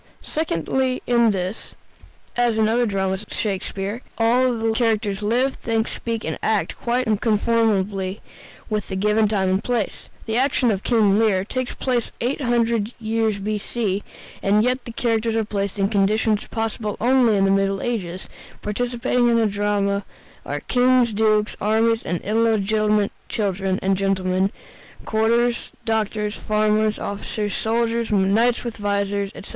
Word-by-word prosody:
Secondly, 260 - -1
in 235 -2 +4
this, 190 0 -4 0.6
as 240 -2 +2
in 220 - +3
the 215 - +2
other 240 +1 +2
dramas 190 -1 -1
of 210 - -14
Shakespeare, 200 +2 -3 0.2
all 245 +2 +3
the 225 0 0
characters 220 -3 0
live, 245 +6 +1
think, 225 -1 -1
speak, 230 -1 -4
and - - -3
act 220 -2 0
quite 245 +2 -1
unconformably 210 -3 +1 0.5
with 215 -1 -2
the 190 - -4
given 210 +2 +2
time 195 -3 +1
and 190 +1 0
place. 240 -5 -2 0.2
The 225 0 -1
action 260 -2 +2
of 195 -2 -1
"King 215 -4 +3
Lear" 200 -4 +2
takes 255 +3 -3
place 245 -3 -1
800 235 -3 0
years 220 -1 0
B.C., 205 0 -2 0.4
and 205 +2 +3
yet 250 +1 0
the 235 - -6
characters 225 -1 0
are 225 -1 +1
placed 200 -1 -3
in 195 -1 +2
conditions 210 +1 +1
possible 220 -2 -3
only 245 -3 +4
in 195 - +3
the 195 - +3
Middle 195 0 +1
Ages: 190 -7 -3 0.4
participating 240 +2 0
in 235 - +3
the 225 - +3
drama 205 -1 0 0.4
are - - -3
kings, 250 -2 +3
dukes, 215 0 +2
armies, 225 +2 +2
and 175 0 -2
illegitimate 215 -1 +1 0.2
children, 195 -2 -1
and 195 0 +2
gentlemen, 190 0 0 0.5
courtiers, 235 +2 +1
doctors, 215 -2 -1
farmers, 215 0 +1
officers, 205 +1 -4
soldiers, 230 +1 0
and 195 -2 +2
knights 235 +2 +2
with 235 -2 -5
vizors, 200 0 0
etc. - - -9
215 Hz, 150 wpm, -22 LUFS, 200-235 Hz, 0.6 s, in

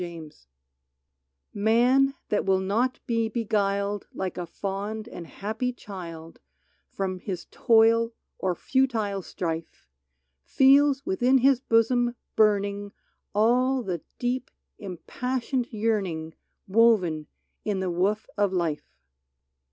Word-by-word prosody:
n 180 - -3
UNREST 160 - -11 1.1
TV 205 - -5
/Tan 250 +5 +4 0.2
that 210 - +1
will 190 -1 +3
not 225 +7 0
be 230 -1 0
beguiled 205 -3 -1
Like 190 -1 -3
a 175 -1 -5
fond 205 +5 -4
and 170 -7 -9
happy 220 +8 -3
child 170 -8 -9 0.5
From 185 -1 -3
his 180 -2 -5
toil 230 0 +4 0.3
or 185 -2 0
futile 225 -5 0
strife, 165 - -5 0.6
Feels 275 +1 +4
within 245 +7 +3
his 265 0 +4
bosom 240 0 +2 0.2
burning 205 -1 +2 0.4
All 250 +4 +3
the 180 -6 -3 0.2
deep, 250 +1 -2 0.3
impassioned 250 - -3
yearning 195 -8 -1 0.3
Woven 190 -8 +3 0.4
in 205 -3 -1
the 185 -1 -1
woof 195 +5 0
of 205 -2 +3
life. 155 - -2
210 Hz, 115 wpm, -26 LUFS, 185-240 Hz, 1.1 s, Tan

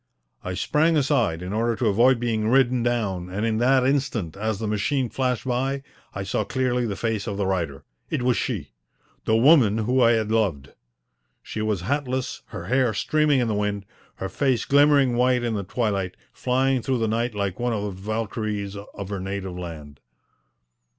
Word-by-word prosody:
I 90 0 -4
sprang 155 - +2
aside 120 - +1
in 90 +2 -5
order 115 +2 +1
to 125 - -2
avoid 115 +4 +4
being 110 -3 0
ridden 125 -1 +3
down, 105 -7 -1
and 100 +4 -2
in 110 -1 0
that 130 +1 +4
instant, 130 - 0
as 110 +1 -2
the 110 - -4
machine 115 +5 0
flashed 125 0 -1
by, 135 +2 -1 0.3
I 100 - -3
saw 100 - -1
clearly 125 -2 0
the 100 - -3
face 110 0 -2
of 100 -2 -3
the 100 - 0
rider. 85 -8 -2 0.3
It 140 -5 -1
was 125 -1 +3
she - - -3 0.5
the 110 - +3
woman 120 -5 +5
whom 125 +4 +1
I 120 -1 +6
had 110 -1 0
loved. 95 -12 0 0.7
She 110 - -5
was 105 -4 -1
hatless, 130 +3 -2
her 100 -6 -7
hair 125 0 +1
streaming 150 +4 +2
in 120 - 0
the 110 - 0
wind, 105 -1 -2 0.3
her 95 - -4
face 130 +2 0
glimmering 140 -3 +4
white 125 0 +3
in 120 -2 -1
the 100 -2 -2
twilight, 100 -3 -2 0.2
flying 130 0 +1
through 130 +2 0
the 115 -1 0
night 115 +1 -1
like 100 -3 -2
one 120 0 0
of 105 -3 -2
the 105 - -3
Valkyries 105 -1 -3
of 100 -1 -8
her 100 -2 -3
native 95 -1 -4
land. 80 -5 -8
115 Hz, 185 wpm, -24 LUFS, 100-125 Hz, 0.7 s, I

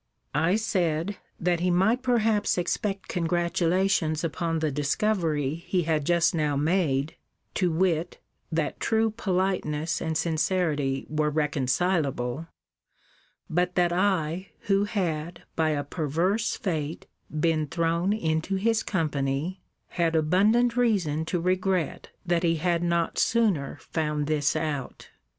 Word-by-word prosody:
I 165 +6 +2
said, 185 -4 0 0.2
that 175 0 +1
he 180 +1 +1
might 195 +8 +3
perhaps 225 -6 +2
expect 195 +3 -2
congratulation 175 0 +1
upon 165 0 -1
the 155 -1 0
discovery 150 - 0
he 180 -2 +1
had 155 -3 0
just 170 -1 +3
now 150 -3 0
made, 150 -2 +1 0.4
to 180 -3 +1
wit, 170 0 0 0.3
that 160 -2 -1
true 225 0 +2
politeness 185 -7 -1
and 160 -1 -1
sincerity 155 -5 0
were 150 0 0
reconcilable: 150 -1 0 1.0
but 180 +2 0
that 175 -1 +3
I, 185 -1 0
who 200 0 +2
had, 170 -5 -3
by 160 -1 +2
a 145 -2 0
perverse 170 +8 0
fate, 160 -5 -3 0.3
been 155 -1 +1
thrown 170 +4 0
into 160 -2 0
his 220 +3 +1
company, 155 0 -1 0.3
had 165 -2 0
abundant 210 +10 +3
reason 185 -11 +1
to 175 +2 -1
regret 185 -1 0 0.2
that 175 -1 +1
he 165 -2 +2
had 170 +1 0
not 170 -1 0
sooner 205 -12 +1
found 150 -2 -2
this 145 -1 +1
out. 150 -4 -4
170 Hz, 125 wpm, -26 LUFS, 155-190 Hz, 1.0 s, might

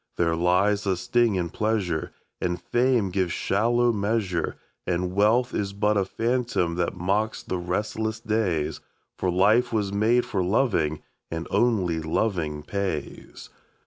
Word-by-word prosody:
There 85 -1 +2
lies 95 +4 +2
a 95 -2 +1
sting 115 +4 +2
in 85 -2 -2
pleasure, 100 -8 -1 0.3
And 90 0 -1
fame 120 -5 +1
gives 90 -2 0
shallow 120 +6 +2
measure, 100 -4 -1 0.3
And 90 +1 -1
wealth 110 +5 +3
is 100 -1 -2
but 105 +1 +1
a 100 -2 +2
phantom 115 -5 0
that 90 0 -1
mocks 100 +5 -1
the 90 - -3
restless 105 +5 -2
days, 105 -9 -1 0.4
For 95 - 0
life 105 +7 +3
was 105 -3 -1
made 115 +4 +3
for 95 -2 -1
loving, 90 - +1 0.3
and 80 0 -4
only 95 -9 +2
loving 80 -2 -1
pays. 95 -4 -5
100 Hz, 140 wpm, -25 LUFS, 90-110 Hz, 0.4 s, wealth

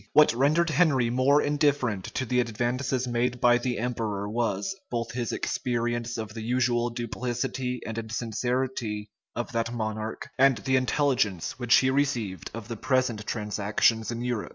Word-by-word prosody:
What 150 -3 +6
rendered 155 +7 +2
Henry 135 -7 +3
more 135 +4 +4
indifferent 145 - +1
to 130 - 0
the 125 +1 +1
advances 125 +2 -1
made 125 +1 0
by 120 0 +5
the 125 0 -2
emperor 110 -4 -2
was, 110 - -1
both 115 -1 -2
his 120 -1 -2
experience 120 -1 -2
of 110 -1 -5
the 115 - -6
usual 120 0 +1
duplicity 125 +1 -3
and 110 +1 -3
insincerity 115 -1 -2 0.2
of 120 - -3
that 115 0 -1
monarch, 110 -1 -4
and 135 -2 +5
the 130 - 0
intelligence 130 - +1
which 120 -1 +4
he 130 0 +4
received 115 - -1
of 115 -2 -7
the 115 -2 -5
present 130 -4 0
transactions 105 +1 +1
in 120 0 -3
Europe. 120 -3 -2
120 Hz, 155 wpm, -27 LUFS, 110-130 Hz, 0.2 s, What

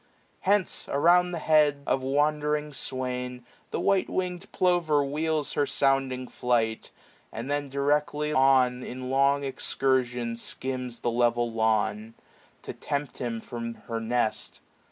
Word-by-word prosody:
Hence, 200 -1 +1
around 175 +5 +4
the 175 - -4
head 150 -3 +3
Of 135 - +1
wandering 150 +2 0
swain, 125 -2 -4 0.2
the - - -3
white 195 -1 +2
wingM 180 -1 -3
plover 170 -6 +2
wheels 155 +1 -1
Her 145 - +1
sounding 135 -2 +1
flight; 115 -3 -1 0.4
and 120 +5 -5
then 145 -1 -1
directly 150 +2 0
on 130 -2 +4
In 130 +1 -6
long 140 +1 +3
excursion 125 -3 -1
skims 125 0 -4
the 120 - 0
level 120 0 +1
lawn. 110 0 0 0.5
To - - -6
tempt 145 -1 -4
him 115 -2 -3
from 115 -1 -6
her 115 -1 -5
nest. 115 0 -1
135 Hz, 130 wpm, -27 LUFS, 120-150 Hz, 0.5 s, around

